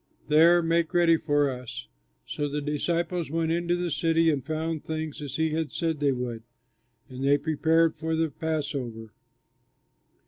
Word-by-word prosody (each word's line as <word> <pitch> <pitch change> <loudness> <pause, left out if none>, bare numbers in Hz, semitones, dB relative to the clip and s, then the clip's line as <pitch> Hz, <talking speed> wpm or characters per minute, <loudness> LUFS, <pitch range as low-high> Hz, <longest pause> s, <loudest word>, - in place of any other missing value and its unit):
There 170 +3 +6
make 165 +1 0
ready 170 -1 +5
for 145 -3 +1
us." 125 -2 -7 0.4
So 145 0 -3
the 145 +1 -2
disciples 165 +3 -1
went 165 +1 0
into 170 +1 0
the 175 -1 -2
city 165 +2 +2
and 140 -4 -2
found 160 +1 -3
things 155 -1 -4
as 140 -2 -6
he 160 0 +1
had 160 -1 -2
said 165 -3 -2
they 145 -1 +2
would; 125 -3 -4 0.7
and 130 0 -7
they 140 +1 +4
prepared 160 +2 +2
for 160 +1 -2
the 160 -1 0
Passover. 135 -8 -4
160 Hz, 160 wpm, -27 LUFS, 145-165 Hz, 0.7 s, There